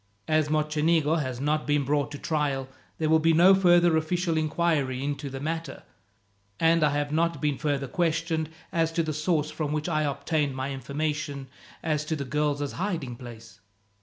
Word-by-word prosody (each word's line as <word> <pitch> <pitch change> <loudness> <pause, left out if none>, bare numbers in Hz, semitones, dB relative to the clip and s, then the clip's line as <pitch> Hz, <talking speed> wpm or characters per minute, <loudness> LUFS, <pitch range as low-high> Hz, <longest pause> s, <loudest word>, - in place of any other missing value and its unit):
As 155 -1 +2
Mocenigo 155 +1 +2
has 130 -3 -4
not 150 +2 0
been 145 -1 +2
brought 145 +1 +1
to 145 - -6
trial, 140 -4 -1 0.3
there 160 - 0
will 160 +1 +5
be 165 +1 +3
no 175 +4 +7
further 175 -3 +5
official 165 +2 0
inquiry 155 -4 0
into 140 0 -3
the 135 0 -6
matter, 160 -1 -4 0.8
and 165 0 +4
I 150 - +5
have 145 0 -1
not 165 +2 +1
been 150 -3 -1
further 140 -2 -1
questioned 165 +1 -1 0.2
as 165 -1 +1
to 165 - +1
the 155 -1 -2
source 155 0 0
from 150 -2 -3
which 150 +1 -2
I 155 -3 +1
obtained 145 0 -1
my 130 +1 -3
information 145 0 -3 0.3
as 155 -2 0
to 160 - -1
the 140 -2 -4
girls' 145 +1 -1
hiding 165 -10 -3
place. 115 -4 -11
150 Hz, 175 wpm, -27 LUFS, 140-160 Hz, 0.8 s, no